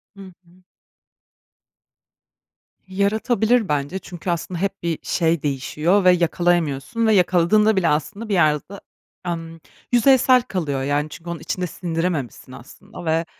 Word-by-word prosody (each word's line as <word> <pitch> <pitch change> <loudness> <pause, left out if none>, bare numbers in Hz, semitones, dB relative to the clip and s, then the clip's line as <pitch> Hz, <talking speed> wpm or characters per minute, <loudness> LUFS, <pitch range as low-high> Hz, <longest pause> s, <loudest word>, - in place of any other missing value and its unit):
Hı 200 - -12 0.2
hı. 180 +2 -24 2.2
Yaratabilir 220 +3 +1
bence 150 +5 -1
çünkü 180 -1 -8
aslında 170 +1 -3
hep 195 -2 -3
bir 170 -2 -2
şey 165 -3 0
değişiyor 150 +7 0
ve 185 - +7
yakalayamıyorsun 175 - 0
ve 220 - +4
yakaladığında 190 +3 +3
bile 185 -3 +1
aslında 200 +9 -2
bir - - 0
yerde, 170 +3 +1 0.5
emm, 165 -1 -5 0.3
yüzeysel 255 +1 +5
kalıyor, 155 - -3
yani, 145 +2 -1
çünkü 170 +3 -10
onun 170 - -4
içinde 180 -1 -3
sindirememişsin 165 - -4
aslında - - -12
ve, 165 +1 +1
175 Hz, 125 wpm, -21 LUFS, 160-200 Hz, 2.2 s, ve